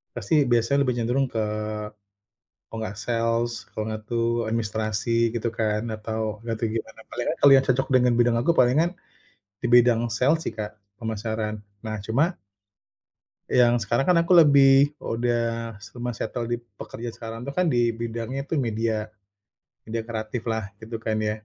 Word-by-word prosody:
pasti 135 +6 +2
biasanya 120 +3 +2
lebih 125 - +1
cenderung 125 +3 +1
ke 110 -1 -1 1.1
kalau 115 - -7
nggak 105 0 -6
sales 115 0 0 0.2
kalau 110 - -2
nggak 110 0 -4
tuh 115 0 0
administrasi 110 +1 0
gitu 115 0 -1
kan 110 -2 -1
atau 110 0 -3
gak 115 -1 -2
tau 115 - +1
gimana, 115 0 -5
palingan - - -2
kalau 140 - +8
yang 135 - +2
cocok 130 +1 +2
dengan 125 -1 +4
bidang 120 -1 +4
aku 130 +8 +3
palingan 155 +6 +3 0.7
di 120 - -1
bidang 120 -1 +5
sales 145 +8 +2
sih, - - -2
Kak, 105 -1 -6 0.2
pemasaran. 110 -1 -3 0.2
Nah, 110 0 -3
cuma 150 +11 +1 1.1
yang 120 -1 +4
sekarang 120 +4 0
kan 170 - +5
aku 170 +2 +3
lebih 140 -3 +7
udah 115 -1 -2
sema 120 +3 -6
settle 115 +1 -4
di 120 - 0
pekerja 115 +1 -9
sekarang 115 +2 -7
tuh 140 - -5
kan 180 -3 +2
di 120 -2 +2
bidangnya 115 +3 -4
itu 150 +2 -2
media, 110 -3 -1 0.8
media 115 +1 -3
kreatif 110 +1 -4
lah 110 -3 -2
gitu 115 +1 -6
kan 110 -1 -2
ya. 105 0 -2
115 Hz, 160 wpm, -25 LUFS, 110-125 Hz, 1.1 s, kalau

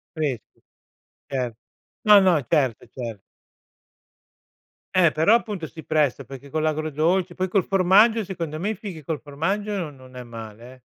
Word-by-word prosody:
Freschi. 140 -9 -4 0.7
Cer 125 -3 -2 0.5
no, 210 -1 +9
no, 180 -5 +4
certo, 130 -6 +1
cer 115 -5 -5 1.8
Eh, 175 -4 +5
però 160 +8 +4
appunto 210 -7 0
si 160 0 -10
presta, 150 -5 +1
perché 135 +1 -11
con 155 0 -1
l'agrodolce, 155 +4 0
poi 185 +1 -1
col 190 0 +1
formaggio, 200 +4 +4
secondo 170 -5 -5
me 195 +5 -1
i 220 - -2
fichi 185 -6 -8
col 155 +1 -3
formaggio 195 +9 -2
non 165 -7 -4
non 130 -1 -16
è 125 - -6
male, 115 0 -10
eh. 130 - -19
155 Hz, 155 wpm, -24 LUFS, 135-190 Hz, 1.8 s, no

